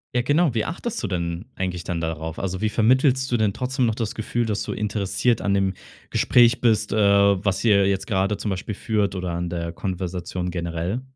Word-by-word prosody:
Ja 120 - +2
genau, 145 0 +2
wie 110 - 0
achtest 210 +7 -4
du 105 - -2
denn 85 +1 -3
eigentlich 90 -2 -3
dann 85 -1 -2
darauf? 80 0 -4
Also, 95 -1 -3
wie 110 - +1
vermittelst 130 +4 +2
du 120 - +3
denn 105 -3 +1
trotzdem 130 0 -1
noch 110 -2 0
das 115 -3 -3
Gefühl, 115 +2 -2
dass 105 -2 -1
du - - -4
interessiert 105 +3 0
an 100 -1 +1
dem 95 -1 +1 0.4
Gespräch 120 +1 +4
bist, 115 -5 +2
äh, 110 - 0
was 100 -1 +3
ihr 100 -3 +4
jetzt 95 -1 -1
grade 100 -1 +1
zum 105 +1 -4
Beispiel 95 +2 -4
führt 105 -4 -1
oder 90 -1 -3
an 85 0 -3
der 85 -1 -3
Konversation 90 -1 -4
generell? 85 +6 -3
100 Hz, 205 wpm, -23 LUFS, 90-115 Hz, 0.4 s, Gespräch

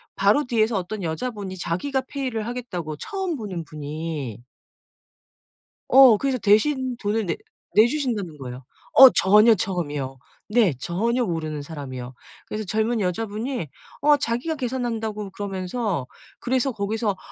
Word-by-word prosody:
바로 210 +9 +3
뒤에서 225 -3 +1
어떤 195 +3 -4
여자분이 190 +2 -4
자기가 260 +12 -1
페이를 255 -6 -3
하겠다고 195 -11 -5
처음 380 - -3
보는 190 - -5
분이. 150 -5 -5 1.5
어 260 -5 +8
그래서 270 0 0
대신 255 +5 +2
돈을 210 0 -1
내 - - -2 0.4
내 220 +2 +8
주신다는 230 - -2
거예요. 125 -1 -8 0.3
어 265 -1 +11
전혀 210 +4 +6
처음이요. 150 -9 -3 0.3
네 210 - +3
전혀 230 - 0
모르는 155 -4 -3
사람이요. 130 -4 -7 0.3
그래서 215 0 -4
젊은 220 +3 0
여자분이 210 - -2 0.3
어 295 0 +6
자기가 275 +4 -2
계산한다고 230 -6 -3
그러면서 190 - -3 0.3
그래서 260 +1 0
거기서 210 -1 -2
210 Hz, 310 characters per minute, -24 LUFS, 170-245 Hz, 1.5 s, 어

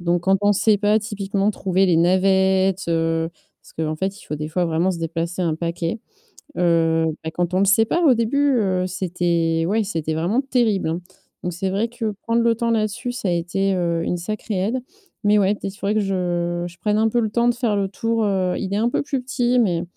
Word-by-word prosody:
Donc 175 0 0
quand 195 0 +3
on 205 0 +4
sait 205 +1 +3
pas 210 +1 +3
typiquement 205 -1 -1
trouver 190 -2 +1
les 170 -3 +3
navettes, 190 +2 +3
heu. 165 0 0 0.3
Parce - - -18
qu'en 155 -1 -2
fait, 190 +3 -3
il - - -15
faut, 150 - -4
des 150 +1 -4
fois, 180 +2 0
vraiment 165 +3 +1
se 170 - -6
déplacer 165 +2 -3
un 165 -3 0
paquet. 170 +4 -3 0.6
Heu, 165 -2 +2 0.2
bah, 160 - -3
quand 175 0 -1
on 185 - +2
ne 200 - +3
sait 205 +3 +5
pas, 345 - 0
au 275 -5 +6
début, 275 +5 +1
heu, 185 -3 0
c'était 170 -3 0
ouais, 220 +3 +2
c'était 160 -5 -2
vraiment 175 +10 +1
terrible, 235 - +1
hein. 165 +2 -3 0.4
Donc 180 - -2
c'est 185 +3 -2
vrai 205 +4 0
que 230 -2 -3
prendre 230 +1 +1
le 230 0 +3
temps 235 0 -1
là-dessus, 230 +3 -1
ça 230 -5 -3
a 175 - +1
été, 190 +3 0
heu, 170 -2 0
une 180 - -1
sacrée 215 +3 -4
aide. 220 +7 0 0.5
Mais 210 0 +4
ouais, 200 0 +3
peut-être, 195 -1 -6
il - - -18
faudrait 200 - -1
que 215 - +2
je 175 -3 -1
je 175 0 -11
prenne 210 0 0
un 225 0 +3
peu 240 - +1
le 220 - 0
temps 235 +2 +2
de 240 - +2
faire 235 -4 0
le 200 -1 +1
tour, 225 +3 -1
heu, 185 -3 0
il 195 -1 -4
est - - +1
un 230 +2 +2
peu - - 0
plus 275 -2 -2
petit, 250 -1 0
mais 175 -7 +2
190 Hz, 235 wpm, -21 LUFS, 175-215 Hz, 0.6 s, au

